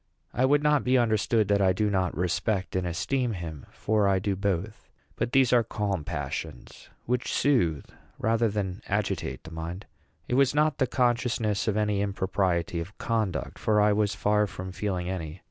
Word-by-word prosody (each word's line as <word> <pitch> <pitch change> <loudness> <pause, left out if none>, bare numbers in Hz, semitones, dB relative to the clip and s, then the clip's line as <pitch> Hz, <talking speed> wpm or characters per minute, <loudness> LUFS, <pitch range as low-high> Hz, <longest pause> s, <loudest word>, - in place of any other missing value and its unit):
I 130 - +2
would 145 +2 +3
not 150 -2 +3
be 130 +1 +3
understood 110 -2 +2
that 100 0 +3
I 95 -1 +4
do 105 +3 0
not 90 -5 0
respect 90 +2 -1
and 95 -1 0
esteem 120 +8 -1
him; 80 -6 -7
for 105 -2 +1
I 95 -1 +3
do 100 +1 -1
both. 100 +2 -3 0.3
But 120 +1 -2
these 130 -2 +4
are 120 -1 +5
calm 100 -6 -2
passions, 65 -4 -6 0.2
which 125 +1 -1
soothe 85 - +2 0.3
rather 115 +1 +1
than 100 -1 -3
agitate 100 -10 -2
the 80 - -11
mind. 85 +4 -6 0.4
It - - -2
was 135 +1 +3
not 150 -1 +2
the 130 - +2
consciousness 120 -5 0
of 105 -1 +1
any 105 -2 +1
impropriety 95 -4 0
of 85 +5 -7
conduct; 110 -7 -2
for 105 -1 +2
I 105 0 +4
was 105 0 +1
far 105 0 +2
from 95 0 -7
feeling 90 -2 -3
any. 90 -2 -5
105 Hz, 180 wpm, -27 LUFS, 90-115 Hz, 0.4 s, are